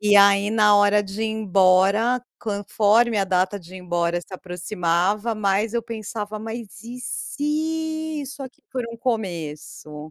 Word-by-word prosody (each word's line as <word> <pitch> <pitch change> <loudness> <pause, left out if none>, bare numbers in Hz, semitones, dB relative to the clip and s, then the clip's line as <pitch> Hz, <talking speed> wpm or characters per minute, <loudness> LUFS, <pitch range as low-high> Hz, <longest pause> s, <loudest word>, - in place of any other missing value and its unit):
e 210 -1 +5
aí 200 0 +6
na 210 -1 +5
hora 205 0 +4
de 200 +2 -5
ir - - +1
embora 210 +3 +3 0.2
conforme 210 +2 +2
a 195 - +2
data 185 +1 0
de 175 +1 -14
ir 185 - -7
embora 175 -1 0
se - - -19
aproximava 180 +4 -1
mais 210 +2 0
eu 235 - 0
pensava: 215 -1 -5
"Mas 225 -2 -7
e 240 +2 -8
se 315 +3 -2
isso 280 +1 -8
aqui 260 -1 -11
for 255 -2 -2
um 230 - -8
começo?" 155 -9 -4
210 Hz, 155 wpm, -23 LUFS, 185-230 Hz, 0.2 s, aí